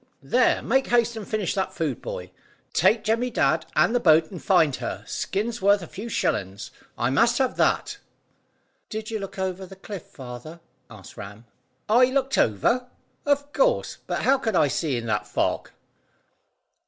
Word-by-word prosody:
"There, - - +2
make 265 0 +2
haste 235 -1 +2
and 220 -3 -7
finish 215 -5 -1
that 190 -1 -2
food, 160 -3 -2
boy. - - -6 0.4
Take 220 -1 +3
Jemmy 230 +3 +1
Dadd - - +1
and - - +4
the 245 - +3
boat 160 -4 +4
and 180 - -8
find 165 -8 +3
her. - - -5
Skin's 225 +3 -3
worth 200 -1 +4
a - - -8
few 215 +8 -7
shillings. 95 - -2 0.3
I 120 +2 0
must 230 - +3
have 260 -2 +1
that." 425 -1 +1 0.9
"Did 220 +1 -5
you 220 - -2
look 195 -1 -7
over 190 0 -3
the 195 - -12
cliff, 195 -1 -8
father?" 130 +5 -10 0.3
asked 105 -4 -13
Ram. 105 +3 -9 0.4
"I 240 +4 +6
looked 265 +1 0
over? 235 - +2 0.4
Of 285 0 +1
course, - - +1
but - - -2
how 270 0 +4
could 220 -6 -1
I 145 - +4
see 140 -1 -1
in 115 - -4
that 105 -2 -1
fog?" - - -1
205 Hz, 170 wpm, -25 LUFS, 155-240 Hz, 0.9 s, I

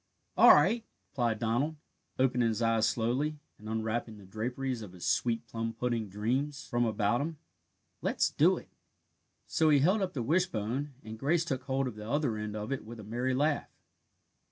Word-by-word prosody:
"All - - +8
right," 205 +11 +3 0.3
replied 120 -5 0
Donald, 120 +8 0 0.4
opening 125 -2 +2
his 115 +1 -1
eyes 115 -1 +3
slowly, 125 +8 0 0.2
and 105 +1 -9
unwrapping 110 0 -2
the 100 - -13
draperies 125 +5 -3
of 100 -4 -9
his 90 - -8
sweet 115 -1 +1
plum 115 0 -4
pudding 115 -2 -2
dreams 130 +8 -2
from 120 0 +1
about 110 +2 +1
him, 160 +2 -3 0.6
"let's - - +1
do - - +4
it - - -10
now." - - -41 0.7
So 160 -1 +2
he 150 - +6
held 185 +10 +3
up 185 -2 -1
the 125 - -2
wishbone, 140 - 0
and 110 0 -8
Grace 160 +5 +2
took 130 -5 -3
hold 135 0 0
of 125 - -4
the 105 +1 -7
other 140 -5 +1
end 105 0 -4
of 105 +4 -4
it 135 - -2
with 115 +1 -9
a - - -8
merry 120 +5 -1
laugh. 145 +2 +1
120 Hz, 185 wpm, -31 LUFS, 110-140 Hz, 0.7 s, All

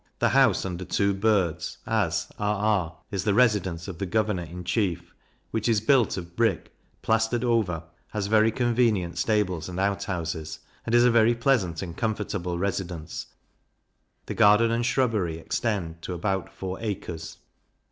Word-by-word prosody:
the - - +2
house - - +4
under 90 -1 -4
two 100 +2 +1
birds, 95 -5 0
as 90 -7 0
r 105 0 +1
r, 100 -5 0
is 95 -3 -2
the 105 -2 +1
Residence 105 -8 +2
of 90 -4 -7
the 100 - -1
Governor 105 -1 0
in 85 +2 -8
Chief, 90 -3 -1 0.4
which 110 +1 -1
is 110 -2 +3
built 120 0 +3
of 85 -1 -7
brick, 115 -3 0 0.3
plaistered 115 +2 +1
over; 110 -9 +1 0.2
has 105 -2 -3
very 110 +2 +4
convenient 115 -8 +1
stables 95 -4 0
and 90 0 -5
outhouses, 85 -5 -2 0.3
and 115 - +2
is 120 - +6
a 125 - +5
very 115 0 +4
pleasant 115 - +1
and 85 -3 -7
comfortable 100 -5 -2
residence; 90 -4 -3 1.0
the - - -4
garden 105 +3 +5
and 120 +1 +1
shrubbery 110 -10 +1
extend 85 -2 -2
to 90 - -5
about 95 +1 -2
four 95 0 -6
acres. 90 -7 -5
100 Hz, 155 wpm, -26 LUFS, 85-110 Hz, 1.0 s, is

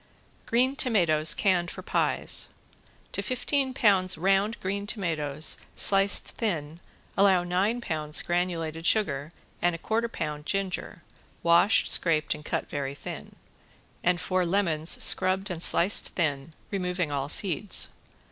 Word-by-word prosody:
~GREEN 255 +3 +1
TOMATOES 170 - +2
CANNED 180 -4 0
FOR - - -8
PIES~ - - 0 0.6
To - - -3
fifteen 260 +2 -1
pounds 195 - +2
round 195 +5 0
green 200 +2 -4
tomatoes 160 -8 -1 0.2
sliced 195 0 +5
thin 165 -7 -4 0.4
allow 190 -2 +3
nine 195 +7 -1
pounds 155 -6 -2
granulated 170 -2 -2
sugar 150 -8 0 0.3
and 175 -1 +1
a - - -6
quarter 225 +6 -2
pound 150 -6 -6
ginger, 190 -4 -4 0.4
washed, 170 +5 +3
scraped 155 -3 +2
and 150 - -11
cut - - -4
very 140 -1 -5
thin, - - -9 0.7
and 180 0 +1
four 185 0 -1
lemons 170 -3 -1
scrubbed 190 +1 +2
and 170 -2 -4
sliced 180 +3 +4
thin, 155 -2 -2 0.2
removing 180 -4 -2
all 140 0 -3
seeds. 190 +3 +2
180 Hz, 130 wpm, -26 LUFS, 155-200 Hz, 0.7 s, sliced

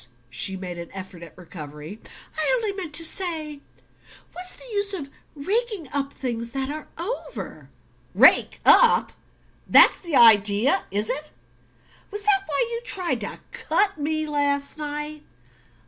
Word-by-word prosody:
She 190 +9 -1
made 180 -2 -7
an 170 - -8
effort 185 -2 -9
at 170 -2 -13
recovery. 155 +2 -10 0.3
"I 315 +8 0
only 445 -4 -1
meant 345 -6 -6
to 330 - +2
say 315 -5 -3 0.7
what's 365 +1 -5
the - - -13
use 405 -1 0
of 280 -6 -7 0.2
raking 400 - -2
up 280 -1 -1
things 235 -2 -4
that 270 0 -2
are 305 0 -7
over?" 450 +8 -6 0.5
"Rake - - +5
up? 485 -2 +7 0.6
That's - - +6
the 340 -5 -3
idea, 215 +1 +5
is 205 +2 -2
it? 295 +5 -4 0.8
Was 415 0 -4
that 405 -2 +4
why - - 0
you 465 0 -4
tried 370 -7 -1
to - - -4
cut 400 -5 0
me 310 +1 -1
last 285 0 -1
night?" 295 0 -5
295 Hz, 145 wpm, -24 LUFS, 230-370 Hz, 0.8 s, up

